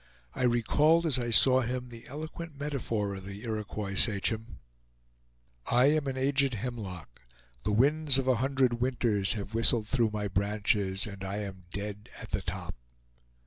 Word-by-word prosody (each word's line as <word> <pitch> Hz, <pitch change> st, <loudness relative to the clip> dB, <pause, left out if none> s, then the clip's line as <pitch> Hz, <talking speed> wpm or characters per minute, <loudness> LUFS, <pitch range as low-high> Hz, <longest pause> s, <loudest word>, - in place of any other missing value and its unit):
I 125 Hz, -, 0 dB
recalled, 150 Hz, +8 st, +3 dB
as 140 Hz, -5 st, +2 dB
I 120 Hz, -1 st, -2 dB
saw 130 Hz, +4 st, +6 dB
him, 125 Hz, +1 st, -4 dB
the 115 Hz, -1 st, -11 dB
eloquent 155 Hz, +1 st, -8 dB
metaphor 115 Hz, -8 st, -2 dB
of 95 Hz, -1 st, -8 dB
the 100 Hz, +1 st, -8 dB
Iroquois 105 Hz, -3 st, -4 dB
sachem: 110 Hz, +2 st, +1 dB, 1.1 s
"I 125 Hz, +4 st, +4 dB
am 155 Hz, -2 st, 0 dB
an 130 Hz, -1 st, -3 dB
aged 135 Hz, -1 st, +1 dB
hemlock; 100 Hz, -, -7 dB, 0.4 s
the 105 Hz, -, -2 dB
winds 140 Hz, +5 st, +3 dB
of 135 Hz, -1 st, -1 dB
a 130 Hz, -2 st, +3 dB
hundred 130 Hz, -3 st, +1 dB
winters 120 Hz, -6 st, +2 dB
have 105 Hz, -1 st, -6 dB
whistled 115 Hz, -1 st, +3 dB
through 120 Hz, -3 st, +1 dB
my 105 Hz, -1 st, -2 dB
branches, 100 Hz, 0 st, +1 dB
and 100 Hz, -3 st, -8 dB
I 95 Hz, +1 st, -4 dB
am 95 Hz, -3 st, -8 dB
dead 105 Hz, +1 st, -6 dB
at -, -, -10 dB
the -, -, -1 dB
top!" -, -, -5 dB
115 Hz, 160 wpm, -29 LUFS, 105-130 Hz, 1.1 s, saw